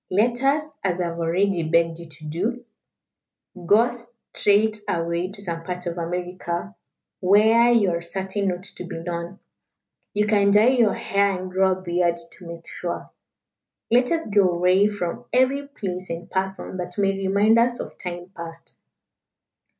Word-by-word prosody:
Let 235 +6 +2
us, 280 +3 +3 0.2
as 185 -2 0
I 175 -1 0
have 170 0 -6
already 175 +2 +1
begged 165 +1 +1
you 170 - -9
to 155 0 -10
do, 215 +11 -3 1.0
go 230 +5 +5 0.4
straight 215 +1 +2
away 170 +1 -1
to 200 +1 -11
some 165 -3 -4
part 180 +1 -5
of 175 0 -3
America, 175 - -4 0.5
where 220 +5 +5
you 210 -6 +4
are 170 0 -2
certain 190 +3 -3
not 180 0 -2
to 195 - -8
be 175 - -6
known. 170 +2 -5 0.8
You 210 0 +2
can 205 -1 +3
dye 210 +4 +6
your 240 -5 +3
hair 200 0 +1
and 185 0 -6
grow 190 0 +3
a 185 - -7
beard 175 -1 +1
to 180 - -13
make 170 0 -9
sure. 175 -1 -5 0.8
Let 245 +1 +4
us 330 -1 0
go 200 -3 +3
away 180 +3 +3
from 190 -5 -4
every 265 +3 +2
place 185 -9 -5
and 170 +1 -6
person 190 0 -3
that 180 +1 -6
may 195 -1 +3
remind 200 +3 +3
us 240 +1 +2
of - - -7
time 175 0 -6
past. 165 0 -9
185 Hz, 165 wpm, -23 LUFS, 175-210 Hz, 1.0 s, dye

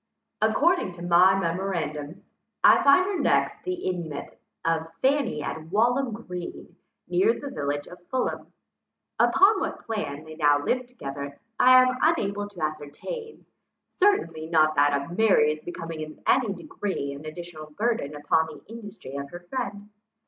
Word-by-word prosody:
According 345 - +2
to 175 0 -10
my 180 +2 +5
memorandums, 165 -4 -3 0.4
I - - +7
find 280 +7 +6
her 390 -1 -2
next - - +1
the 365 - -2
inmate 175 - -4 0.3
of 165 0 0
Fanny 265 - +1
at 160 0 -5
Walham 240 +8 +1
Green, 180 -6 -7 0.3
near 410 +5 +2
the 285 - -6
village 145 0 -2
of 180 - -13
Fulham. 260 -1 -2 0.7
Upon 395 +1 +5
what - - -4
plan 155 -11 -4
they 155 0 -10
now 145 -2 +4
lived 250 - -1
together 140 - -7 0.2
I 255 0 +8
am 255 0 0
unable 205 -11 +1
to 180 -6 -7
ascertain; 155 - -6 0.5
certainly 165 - +2
not 155 -2 +4
that 145 -1 +3
of 140 +5 -7
Mary's 155 -8 +3
becoming 165 -2 -6
in 155 0 -9
any 250 -6 +3
degree 175 -5 -4
an 140 +2 -10
additional 155 -1 -8
burthen 200 -4 -1
upon 150 +2 +1
the 155 -2 -11
industry 210 - -9
of 140 0 -5
her 175 +3 -9
friend. 205 -6 -4
175 Hz, 150 wpm, -26 LUFS, 155-240 Hz, 0.7 s, I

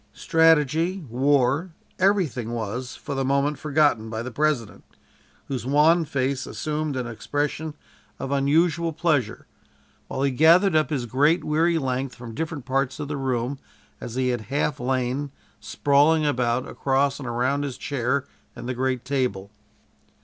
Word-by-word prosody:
Strategy, 160 +2 +2
war, 140 +6 +1 0.2
everything 175 - +1
was, 120 +3 -4
for 145 - -6
the 135 -1 -1
moment 140 +2 +1
forgotten 145 -7 +2
by 110 +1 -4
the 125 - -6
President, 145 -6 -1 0.6
whose 130 -5 -3
wan 155 +6 +4
face 135 -1 -2
assumed 150 -1 -3
an 125 -1 -2
expression 145 +6 -3 0.4
of 135 - -5
unusual 160 +4 +2
pleasure, 150 -8 0 0.6
while 135 - -3
he 140 - +2
gathered 165 +7 +5
up 155 0 +3
his 135 -6 -2
great, 145 +9 +2
weary 165 +2 +2
length 130 -2 -2
from 120 -2 -9
different 155 0 -4
parts 135 +1 -1
of 145 -1 -5
the 150 - -2
room 130 0 -2 0.4
as 120 - -7
he 130 0 +1
had 120 -2 -1
half 145 0 -1
lain, 130 +2 -1 0.3
sprawling 145 +8 +2
about, 125 -3 0
across 135 +1 0
and 135 - -6
around 130 +4 0
his 135 -3 -4
chair 140 0 -1 0.3
and 120 0 -7
the 130 - -1
great 130 0 -1
table. 125 -8 -2
140 Hz, 150 wpm, -24 LUFS, 125-150 Hz, 0.6 s, gathered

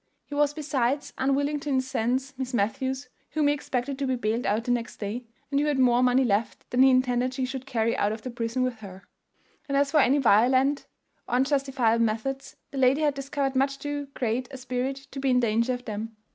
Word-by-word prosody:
He - - -10
was 290 0 +2
besides 285 -2 -1
unwilling 285 +2 +1
to 290 - -5
incense 260 0 0
Miss 260 -1 -4
Matthews, 260 +5 -1 0.3
whom 305 -1 +2
he 290 - +4
expected 270 -1 -3
to 275 - -1
be 260 - +1
bailed 230 0 -1
out 210 +3 +1
the 245 - -1
next 240 -1 -2
day, 225 +4 -4 0.3
and 280 - +2
who 295 - +1
had 295 -2 +1
more 250 -2 +4
money 255 +1 +4
left 215 -1 -1
than 245 - +3
he 265 - +8
intended 255 0 +2
she 260 -1 -1
should 260 0 -6
carry 230 -3 0
out 205 - +1
of 220 0 -6
the 255 - -5
prison 235 +2 -2
with 250 -3 -2
her; 195 -2 -10 0.7
and 275 - +1
as 280 0 +2
for 305 - +4
any 275 0 +4
violent 260 +3 +3 0.4
or 245 - -1
unjustifiable 265 -4 +2
methods, 230 +5 -2 0.2
the 275 - -4
lady 260 +3 +4
had 295 -2 +2
discovered 275 0 -2
much 275 +1 +1
too 290 0 -4
great 245 +1 -1
a 270 - -8
spirit 255 +1 -2 0.2
to 275 - -6
be 270 0 0
in 250 -1 +4
danger 230 +1 +1
of 245 0 -4
them. 220 +1 -5
260 Hz, 215 wpm, -26 LUFS, 235-275 Hz, 0.7 s, he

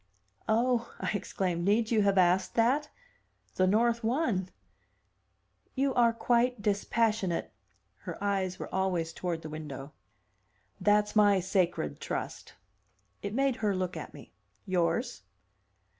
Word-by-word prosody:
"Oh!" 235 +1 +1
I - - -2
exclaimed. 185 -3 -2
"Need 215 +4 +2
you 220 -2 +4
have 200 -1 +2
asked 185 +1 +3
that? 265 +6 +2 0.6
The 185 - +2
North 230 +4 +2
won." 225 - 0 1.3
"You 270 0 +1
are 235 -2 +4
quite 240 +1 +1
dispassionate!" 205 -2 0 0.5
Her - - -7
eyes 195 -2 -1
were - - -8
always 180 -4 0
toward 170 -2 -3
the 155 - -6
window. 150 -2 -7 0.9
"That's 210 0 +2
my 205 -2 +5
'sacred 180 - 0
trust.'" - - -5 0.7
It 200 +2 -4
made 270 -1 +1
her 210 -3 0
look 185 -1 -2
at - - -7
me. - - -13 0.3
"Yours?" 180 +4 0
205 Hz, 125 wpm, -30 LUFS, 185-230 Hz, 1.3 s, my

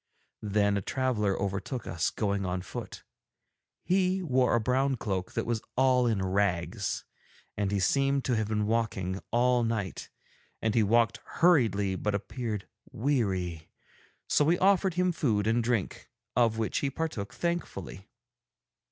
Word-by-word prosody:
Then 100 0 +2
a - - -1
traveller 105 -4 0
overtook 100 +5 -3
us 80 -1 -1
going 100 -2 -1
on 90 -1 -2
foot; - - -7 0.8
he 185 0 +1
wore 130 -6 +2
a - - +3
brown 130 +4 +1
cloak 95 -6 -3
that - - -1
was 115 -2 -1
all 130 -1 +4
in 100 -5 0
rags 95 -3 -1 0.5
and 100 -1 -1
he 100 - +1
seemed 135 +6 +2
to 125 - +1
have 110 -2 0
been 105 -1 0
walking 105 -4 -1
all 125 +1 +3
night, 110 -5 -3 0.5
and 110 -1 0
he 115 - +4
walked 115 0 +3
hurriedly 110 - +2
but 105 +2 -1
appeared 105 0 -4 0.2
weary, 100 - -1 0.6
so - - +3
we 165 +4 +3
offered 190 -2 +3
him 180 0 +2
food 110 -11 0
and 115 +2 +2
drink, 115 -5 -2 0.3
of 115 -2 +3
which 110 -1 -1
he 140 - 0
partook 135 -9 -4
thankfully. 155 - -4
110 Hz, 145 wpm, -29 LUFS, 100-130 Hz, 0.8 s, all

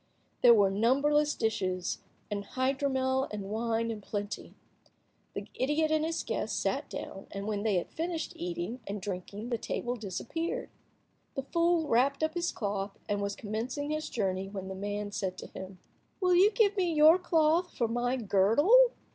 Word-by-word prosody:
There 240 -2 +8
were 200 -3 +4
numberless 280 +8 +3
dishes, 185 -5 -1 0.3
and 200 -1 -2
hydromel 265 +2 0
and 205 -1 -5
wine 230 +1 0
in 215 -2 -6
plenty. 205 0 -5 0.8
The - - -4
idiot 300 +4 +1
and 310 0 +2
his 325 +1 -1
guest - - -2
sat - - -1
down, 195 - -7
and 200 0 -5
when 210 -1 -1
they 210 -2 +1
had 175 - -1
finished 330 0 -3
eating 340 -6 -4
and 205 +1 -3
drinking 200 +3 -5
the 235 -2 -1
table 240 +3 -2
disappeared. 290 - -4 0.6
The 270 - -2
fool 335 +1 +2
wrapped 275 +5 +2
up 315 0 +1
his 345 0 -1
cloth, 200 -2 -3
and 205 0 -1
was 200 0 -2
commencing 240 +7 -3
his 310 0 -2
journey, 195 -3 -1
when 190 -1 -6
the - - -4
man 205 +1 -4
said 185 -2 -3
to - - -7
him— 190 0 -8 0.4
"Will 365 -2 +3
you 370 +4 +7
give 420 -2 +3
me 365 -4 +1
your 315 +3 +7
cloth 335 0 +2
for 235 - +2
my 240 +2 0
girdle? 260 - +5
240 Hz, 170 wpm, -30 LUFS, 205-315 Hz, 0.8 s, There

